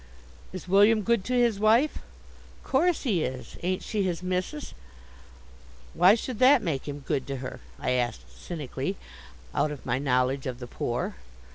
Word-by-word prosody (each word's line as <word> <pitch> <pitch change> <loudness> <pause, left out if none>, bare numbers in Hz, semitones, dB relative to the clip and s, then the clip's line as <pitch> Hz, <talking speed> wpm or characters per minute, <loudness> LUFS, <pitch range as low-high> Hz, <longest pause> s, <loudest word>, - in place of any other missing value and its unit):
"Is 185 -1 -8
William 205 +3 +5
good 230 -2 +2
to 250 - -2
his 240 -4 +3
wife?" 230 +8 +3 0.6
"Course 335 +5 +2
he 195 - +1
is. 125 -2 -5
Ain't 185 +1 -1
she 215 -2 -1
his 180 -2 -1
missis?" 185 +11 -3 1.2
"Why 180 +5 +6
should 235 0 -5
that 260 0 +6
make 150 -7 -2
him 145 0 -5
good 140 -3 -1
to 140 - -3
her?" 130 -1 -6 0.2
I - - -1
asked 120 -3 -1
cynically, 155 +2 -4 0.6
out 155 - +1
of 150 -3 -8
my 125 +1 0
knowledge 130 0 +1
of 125 -2 -4
the 125 - -7
poor. 120 - -3
180 Hz, 160 wpm, -27 LUFS, 135-220 Hz, 1.2 s, Why